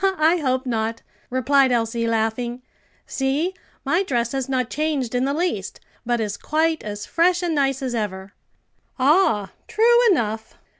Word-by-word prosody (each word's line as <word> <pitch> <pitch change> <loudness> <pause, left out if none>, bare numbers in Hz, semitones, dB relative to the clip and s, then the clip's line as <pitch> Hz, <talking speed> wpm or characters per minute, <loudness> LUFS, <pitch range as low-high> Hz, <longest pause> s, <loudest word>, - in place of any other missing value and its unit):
"I 320 +3 +4
hope 260 -4 -1
not," 225 -2 -2 0.3
replied 260 +1 +3
Elsie, 230 -1 0
laughing. 230 +2 -1 0.4
"See, 285 +7 -1 0.3
my 340 - +2
dress 240 - -1
has 270 -1 -3
not 255 -2 -1
changed 295 -6 -1
in 250 +1 +1
the 275 - 0
least, 305 - -2 0.3
but 240 -1 +1
is 205 -2 -2
quite 320 +1 0
as 210 0 -6
fresh 350 +1 +2
and 345 -2 0
nice 275 -2 0
as 255 -2 -2
ever." 195 -4 -4 0.6
"Ah, 260 - +3 0.2
true 475 +2 +4
enough! 220 - -1
255 Hz, 150 wpm, -22 LUFS, 225-310 Hz, 0.6 s, I